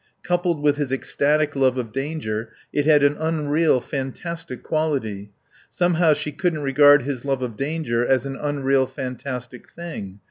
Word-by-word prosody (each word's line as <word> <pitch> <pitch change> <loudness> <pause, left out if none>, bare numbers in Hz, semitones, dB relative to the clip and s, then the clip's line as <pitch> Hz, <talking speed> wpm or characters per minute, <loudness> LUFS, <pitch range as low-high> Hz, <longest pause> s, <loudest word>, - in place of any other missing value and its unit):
Coupled 175 -3 0
with 145 -1 +3
his 145 -3 -2
ecstatic 145 +2 +1
love 130 -2 +2
of 120 -3 -3
danger 130 -6 -3 0.2
it 145 0 +1
had 150 -2 +6
an 145 +1 +4
unreal, 155 -2 +2
fantastic 135 +2 -5
quality. 130 -11 -2 0.4
Somehow 175 -2 +3
she 150 0 -3
couldn't 155 0 -1
regard 145 0 +6
his 135 -2 -4
love 135 -2 -1
of 120 -3 -4
danger 135 -3 -1
as 130 +2 +2
an 135 -1 -4
unreal, 135 -2 +1
fantastic 125 -1 -6
thing. 105 - -8
140 Hz, 150 wpm, -23 LUFS, 130-155 Hz, 0.4 s, had